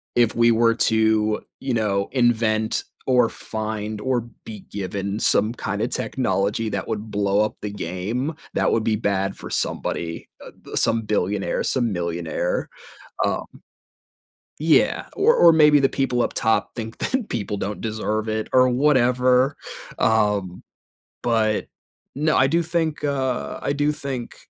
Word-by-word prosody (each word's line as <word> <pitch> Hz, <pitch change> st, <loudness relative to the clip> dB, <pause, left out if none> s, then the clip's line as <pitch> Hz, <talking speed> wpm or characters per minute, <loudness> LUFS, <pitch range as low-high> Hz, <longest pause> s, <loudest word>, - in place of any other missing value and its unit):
if 120 Hz, -2 st, +3 dB
we 115 Hz, 0 st, +5 dB
were 115 Hz, 0 st, +3 dB
to, 110 Hz, -1 st, +2 dB, 0.2 s
you 135 Hz, -2 st, -2 dB
know, 100 Hz, -3 st, 0 dB
invent 115 Hz, -3 st, +1 dB, 0.2 s
or 125 Hz, -3 st, +4 dB
find 110 Hz, -1 st, -5 dB
or 125 Hz, +1 st, 0 dB, 0.2 s
be 105 Hz, -3 st, -8 dB
given 100 Hz, +1 st, -3 dB
some 110 Hz, 0 st, +2 dB
kinda 105 Hz, +1 st, -2 dB
technology 110 Hz, -4 st, -1 dB
that 100 Hz, -2 st, -3 dB
would 110 Hz, -1 st, -4 dB
blow 100 Hz, 0 st, +1 dB
up 110 Hz, +1 st, -2 dB
the 105 Hz, -, -3 dB
game, 100 Hz, -, -3 dB, 0.2 s
that -, -, +1 dB
would 110 Hz, -, +1 dB
be 110 Hz, -, +2 dB
bad 100 Hz, -2 st, -1 dB
for -, -, -9 dB
somebody, 85 Hz, -1 st, -3 dB, 0.2 s
uh, -, -, -10 dB
b -, -, -13 dB
some 115 Hz, 0 st, +2 dB
billionaire, 105 Hz, -2 st, -1 dB
some 120 Hz, -4 st, 0 dB
millionaire, 95 Hz, -, -2 dB, 0.6 s
um -, -, -1 dB, 1.1 s
Yeah, -, -, +3 dB
or 430 Hz, +4 st, +4 dB
or 170 Hz, -, +7 dB
maybe 150 Hz, -2 st, +6 dB
the 135 Hz, -1 st, +3 dB
people 130 Hz, -3 st, 0 dB
up -, -, -1 dB
top 110 Hz, 0 st, 0 dB
think 115 Hz, -1 st, -6 dB
that 255 Hz, -4 st, -1 dB
people 105 Hz, -2 st, -3 dB
don't 100 Hz, +2 st, -4 dB
deserve 110 Hz, 0 st, -2 dB
it 110 Hz, 0 st, -2 dB
or 130 Hz, 0 st, +5 dB
whatever, 125 Hz, 0 st, +3 dB, 0.4 s
um, 105 Hz, -5 st, +1 dB, 0.6 s
but, 110 Hz, -2 st, +1 dB, 0.5 s
no, 155 Hz, +2 st, +1 dB
I 130 Hz, -, +5 dB
do 170 Hz, +5 st, +2 dB
think, 160 Hz, -2 st, -2 dB
uh 135 Hz, -3 st, -1 dB
I -, -, 0 dB
do 145 Hz, +1 st, +1 dB
think 135 Hz, -5 st, -6 dB
110 Hz, 145 wpm, -23 LUFS, 105-130 Hz, 1.1 s, or